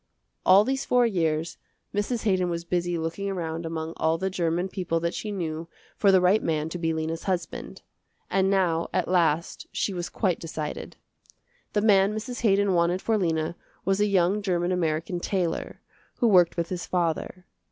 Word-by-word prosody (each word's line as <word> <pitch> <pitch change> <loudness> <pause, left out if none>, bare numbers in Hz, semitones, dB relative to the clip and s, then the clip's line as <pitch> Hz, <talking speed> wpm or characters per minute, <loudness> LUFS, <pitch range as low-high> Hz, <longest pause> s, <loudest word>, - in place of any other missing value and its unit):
All 190 +2 +8
these 265 +3 -1
four 245 -1 +3
years 165 -6 -1 0.3
Mrs. 210 +3 -1
Haydon 185 -4 +2
was 170 0 -3
busy 175 0 -1
looking 165 +5 -3
around 165 -3 -3
among 160 0 -4
all 160 +1 +1
the 190 +2 -2
german 175 0 0
people 180 -4 -2
that 170 +1 -1
she 210 - -4
knew 165 -4 -4 0.3
for 200 - +4
the 190 - +6
right 185 +4 +4
man 155 -1 -1
to 175 - -5
be 165 -1 0
Lena's 160 +1 -3
husband, 185 -3 -3 0.4
and 190 0 +2
now 180 -4 +1
at 185 -2 +1
last 170 -2 +1
she 200 - -1
was 175 -1 -4
quite 185 -6 0
decided. 155 -2 -5 0.8
The 210 - +2
man 205 -1 +4
Mrs. 240 +3 -5
Haydon 200 -3 +3
wanted 175 +1 +2
for 225 +3 0
Lena 165 -4 0 0.3
was 195 +1 +1
a 210 - +3
young 195 +1 +2
german 180 -2 0
american 170 0 -1
tailor, 175 -2 -2 0.3
who 240 - +2
worked 180 -5 +5
with 170 -1 -1
his 180 -2 -4
father. 180 +1 -2
180 Hz, 175 wpm, -26 LUFS, 165-195 Hz, 0.8 s, All